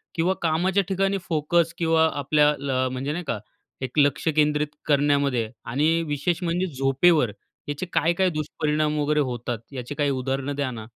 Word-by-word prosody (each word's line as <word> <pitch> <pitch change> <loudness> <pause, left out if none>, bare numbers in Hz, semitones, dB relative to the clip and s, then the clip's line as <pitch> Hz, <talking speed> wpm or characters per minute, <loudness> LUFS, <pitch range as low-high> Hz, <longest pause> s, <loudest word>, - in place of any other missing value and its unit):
किंवा 175 +3 +2
कामाच्या 180 +4 +2
ठिकाणी 195 +1 +1
फोकस 165 +1 +1
किंवा 160 -1 +3
आपल्या 145 +1 +3
अ, 135 -3 -1
म्हणजे 130 +3 -3
नाही 175 +4 -3
का, 110 - -1 0.4
एक 130 +3 -2
लक्ष 145 +2 +2
केंद्रित 150 0 +1
करण्यामध्ये 140 -5 +2 0.2
आणि 155 +7 +2
विशेष 155 +5 -1
म्हणजे 175 +2 0
झोपेवर, 135 -1 +3 0.4
याचे 145 +5 -3
काय-काय 170 +4 +2
दुष्परिणाम 150 -1 -1
वगैरे 150 +1 +1
होतात, 120 -4 -2
याची 130 +1 -6
काही 145 -1 +1
उदाहरणं 135 +2 -2
द्या 140 -3 -1
ना? 110 -2 -7
150 Hz, 155 wpm, -24 LUFS, 135-165 Hz, 0.4 s, किंवा